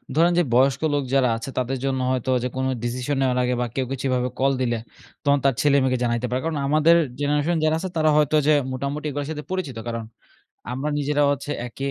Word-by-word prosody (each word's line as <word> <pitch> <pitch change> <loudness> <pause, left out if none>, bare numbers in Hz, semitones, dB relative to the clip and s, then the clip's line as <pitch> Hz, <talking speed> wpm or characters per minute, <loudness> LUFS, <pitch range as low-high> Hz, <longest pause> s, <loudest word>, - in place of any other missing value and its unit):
ধরেন 170 +2 +4
যে 175 - +4
বয়স্ক 135 +2 +3
লোক 145 -1 +1
যারা 130 -3 +4
আছে 115 - -6
তাদের 130 +1 -1
জন্য 135 -1 0
হয়তো 130 0 -1
যে - - 0
কোনো 130 0 0
ডিসিশন 125 +4 -2
নেওয়ার 125 -1 +1
আগে 125 0 0
বা - - +1
কেউ 130 -1 0
কিছু 135 0 -4
এভাবে 125 0 0
কল 135 +1 +3
দিলে, 120 -2 0 0.5
তখন 140 0 +4
তার 135 - +4
ছেলে-মেয়েকে 135 -3 +3
জানাইতে 120 0 0
পারে। 125 +1 -1
কারণ 160 -2 -1
আমাদের 155 +3 +5 0.2
জেনারেশন 145 +3 +1
যারা 155 0 +3
আছে 185 +1 -4
তারা 155 -1 +3
হয়তো 150 0 +3
যে 155 - +6 0.2
মোটামুটি 140 +3 -4
এগুলার 145 0 -4
সাথে 150 -1 -5
পরিচিত 160 -11 -3
কারণ, 115 -1 -3 0.7
আমরা 135 +4 -2
নিজেরাও 145 0 +1
হচ্ছে 140 +1 -5 0.2
একই 135 +3 -4
135 Hz, 210 wpm, -23 LUFS, 125-150 Hz, 0.7 s, যে